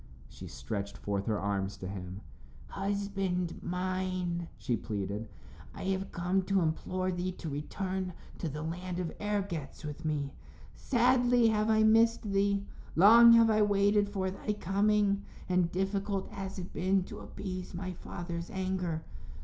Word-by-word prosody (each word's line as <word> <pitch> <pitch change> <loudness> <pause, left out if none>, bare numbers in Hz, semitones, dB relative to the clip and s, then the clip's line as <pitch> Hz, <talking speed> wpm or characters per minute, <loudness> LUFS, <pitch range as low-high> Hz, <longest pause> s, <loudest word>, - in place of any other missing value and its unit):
She - - -10
stretched 100 +10 -5
forth 100 -1 -2
her 110 -2 +1
arms 100 0 -2
to 95 - -6
him. 95 0 -6 0.5
"Husband 195 -3 -2
mine," 180 -1 -2
she 120 - -1
pleaded, 105 0 -4 0.5
"I - - -6
have 195 0 -1
come 180 +2 +1
to 195 -1 +2
implore 185 +3 -1
thee 180 +1 -2
to 170 - -8
return 185 +5 -3 0.3
to 165 - -2
the 150 +2 -5
land 180 +2 -4
of 180 -3 -2
Ergetz 190 -9 -3
with 150 +2 -6
me. 145 -3 -1 0.4
Sadly 245 -1 +3
have 215 0 +1
I 220 0 +4
missed 225 +1 +5
thee; 200 -1 +1 0.3
long 230 +6 +9
have 230 -1 +6
I 215 0 +3
waited 205 0 +3
for 190 -2 -1
thy 210 +2 -3
coming, 200 +1 +2 0.3
and 180 -2 +2
difficult 195 +1 -1
has 195 -1 -6
it 185 -1 -6
been 190 +1 +2
to - - -9
appease 185 -2 -6
my 185 +1 -4
father's 170 -1 -6
anger. 185 -4 -2
185 Hz, 150 wpm, -31 LUFS, 165-200 Hz, 0.5 s, long